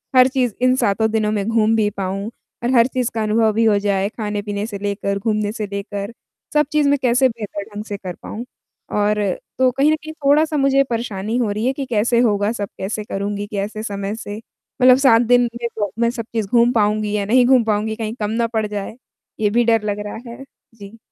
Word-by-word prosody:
हर 255 0 +7
चीज़ 250 -5 0
इन 255 0 +4
सातों 220 -2 +1
दिनों 215 -1 +1
में 205 -2 -1
घूम 225 -1 +2
भी 215 -2 +2
पाऊँ 195 +2 -3 0.3
और 245 - +1
हर 235 0 +6
चीज़ 255 -2 -1
का 220 -1 -1
अनुभव 220 +1 +2
भी 225 +1 +2
हो 210 -2 +4
जाए। 200 -1 0
खाने-पीने 210 -2 -4
से 205 -3 -6
लेकर, 200 0 -2
घूमने 210 0 -1
से 215 -2 -4
लेकर 200 +2 -5 0.4
सब 300 0 +4
चीज़ 300 -2 +3
मैं 285 - +3
कैसे 255 +1 +3
बेहतर 210 -3 -6
ढंग 210 - -4
से 205 - -5
कर 185 -3 -7
पाऊँ 235 +3 -6 0.5
और 210 0 +1 0.3
तो 260 0 +4
कहीं 275 +4 +3
न - - +3
कहीं 315 0 -9
थोड़ा-सा 300 +2 +3
मुझे 275 0 +3
परेशानी 225 -2 -2
हो 235 -4 0
रही 210 +3 -2
है 260 - +2
कि 275 0 -4
कैसे 235 0 +1
होगा, 210 -3 +2
सब 205 -4 -4
कैसे 210 +2 -3
करूँगी, 205 0 -4
कैसे 210 +1 -4
समय 200 -1 -4
से 210 -2 -7 0.4
मतलब 255 0 +7
सात 260 -4 +5
दिन 245 +1 +4 0.2
में 235 - 0
तो 205 -3 -2
मैं 235 0 +3
सब 235 -2 -5
चीज़ 220 -3 -1
घूम 235 +3 +4
पाऊँगी 210 -1 +1
या 200 - -1
नहीं 245 +4 +4
घूम 255 -2 +5
पाऊँगी, 220 0 -1
कहीं 220 -1 -4
कम 210 0 -1
ना 230 +1 0
पड़ 220 -2 -1
जाए। 205 +2 -5 0.4
ये 210 -1 +2
भी 240 +3 +2
डर 225 -2 +3
लग 205 -1 -2
रहा - - -6
है। 255 +3 -9 0.3
जी। 205 +1 -12
220 Hz, 220 wpm, -20 LUFS, 205-240 Hz, 0.5 s, हर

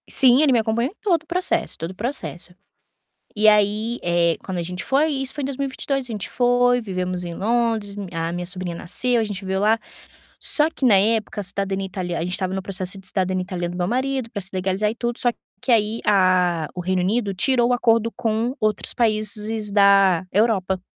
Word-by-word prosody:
Sim, 260 0 +6
ele 300 -3 +4
me 240 - +4
acompanhou 230 +4 -1
em - - -27
todo 345 -7 +1
o - - -30
processo 365 +1 -1
todo 165 +2 -5
o - - -13
processo. 205 - -5 0.8
E 215 +1 +3
aí, 210 +3 +2
eh, 170 -1 +1
quando 185 -2 -4
a - - -1
gente 180 +2 -5
foi, 290 +4 +2
e 270 -2 -2
isso 265 - -2
foi 295 - -5
em - - -2
2022, 275 0 -2
a 240 - -7
gente 210 -2 -4
foi, 245 0 +2
vivemos 185 -3 -3
em 170 -1 -6
Londres, 220 -1 -1
mi 200 -1 -5
a 165 0 -2
minha 175 +1 -4
sobrinha 180 -1 -4
nasceu, 245 +8 0
a - - 0
gente 205 -3 -5
viveu 190 -1 -2
lá. 215 +2 +3 0.6
Só 300 +1 +5
que, 275 - -1
na 225 - +6
época, 215 +2 0
a - - -3
cidadania 195 0 -2
italia 180 -2 -4
a 165 - -2
gente 180 - -4
estava 185 0 -2
no 190 - -3
processo 190 0 -4
de 190 - -5
cidadania 185 -1 0
italiana 175 -1 -4
do - - -6
meu 175 - 0
marido, 260 +2 -2
pra 205 - -5
se 190 - +1
legalizar 190 +3 0
e - - -5
tudo, 240 0 -2
só 245 - +2 0.3
que 255 - -3
aí 220 -1 +2
a 185 -5 +2
o 180 - -5
Reino 185 +1 0
Unido 205 +1 0
tirou 240 +4 +2
o - - +2
acordo 230 -1 +2
com 225 +2 -1
outros 215 -1 -1
países 215 -1 0
da 195 -3 +4
Europa. 195 -3 +1
210 Hz, 220 wpm, -22 LUFS, 185-240 Hz, 0.8 s, Sim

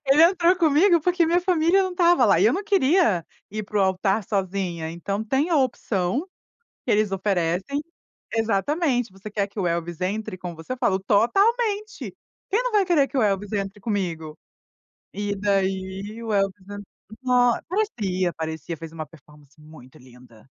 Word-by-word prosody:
Ele 275 +4 +6
entrou 350 0 +5
comigo 335 +2 +4
porque 355 +1 +2
minha 345 +2 +2
família 355 +1 +3
não 375 - -2
estava 350 -1 +4
lá - - +4
e - - +3
eu - - +5
não 395 - -2
queria 350 - +2 0.3
ir 215 +1 -4
para 210 0 -3
o - - +3
altar 195 +2 +1
sozinha. 185 -5 -2
Então 195 +5 -4
tem 270 +8 0
a 335 - +2
opção 245 - -1 0.6
que - - -1
eles 210 -1 +2
oferecem 190 - -1 0.5
exatamente: 240 - 0
"Você 195 +3 -10
quer 205 -1 -1
que 205 +1 -8
o 185 - 0
Elvis 170 0 -3
entre 205 +1 -3
como 180 -2 -6
você?" 160 +10 -6
Eu 255 - -8
falo: 190 -5 +1
"Totalmente. 410 - +1 0.3
Quem 435 +5 +1
não - - -1
vai 415 -2 +4
querer 320 -6 +3
que - - -12
o - - +3
Elvis 200 -1 0
entre 195 0 -3
comigo?" 175 -7 -3 0.8
E 205 +1 -3
daí 195 +2 -2
o 225 - -4
Elvis 195 -1 -1
en 205 0 -7 0.4
nó 245 -1 +3
parecia, 205 - -1
parecia 160 0 -5
fez 165 0 -9
uma 160 -1 -6
performance 150 -1 -20
muito 150 -4 -15
linda, 125 -3 -18
205 Hz, 170 wpm, -24 LUFS, 185-300 Hz, 0.8 s, Ele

